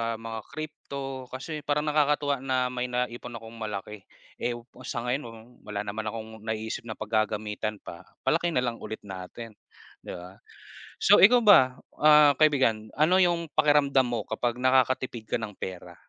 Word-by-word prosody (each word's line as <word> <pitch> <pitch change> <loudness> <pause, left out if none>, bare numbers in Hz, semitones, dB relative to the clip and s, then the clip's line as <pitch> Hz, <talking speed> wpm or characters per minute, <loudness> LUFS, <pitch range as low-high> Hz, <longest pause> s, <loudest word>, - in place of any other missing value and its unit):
mga 115 0 -6
crypto, 140 -3 -7
kasi 150 +5 -6
parang 145 0 +1
nakakatuwa 145 -2 +1
na 130 -1 0
may 125 0 -2
naipon 125 -1 -3
akong 115 0 -10
malaki. 105 -1 -5 0.4
Eh, 120 0 -1 0.3
sa 120 -3 -3
ngayon 125 +4 -1
wa - - -9 0.4
wala 105 -1 -3
naman 105 +1 -4
akong 110 0 -6
naiisip 110 +2 -4
na 110 - -5
paggagamitan 110 0 -2
pa, 85 +2 -10 0.2
palakihin 170 +1 +1
na 125 - +2
lang 120 -2 -2
ulit 110 - -7
natin, 100 +4 -8 0.5
'di - - -8
ba. 90 +2 -11 0.6
So - - +6
ikaw 245 +5 +8
ba, 160 - +6 0.2
ah, 150 -1 +6
kaibigan, 130 -8 +2
ano 160 +4 +4
yung 175 -3 +2
pakiramdam 145 -3 +4
mo 120 -3 -3
kapag 120 +2 -2
nakakatipid 130 -3 +1
ka - - +2
ng 105 -3 -6
pera? 95 -2 -7
125 Hz, 155 wpm, -27 LUFS, 110-145 Hz, 0.6 s, ikaw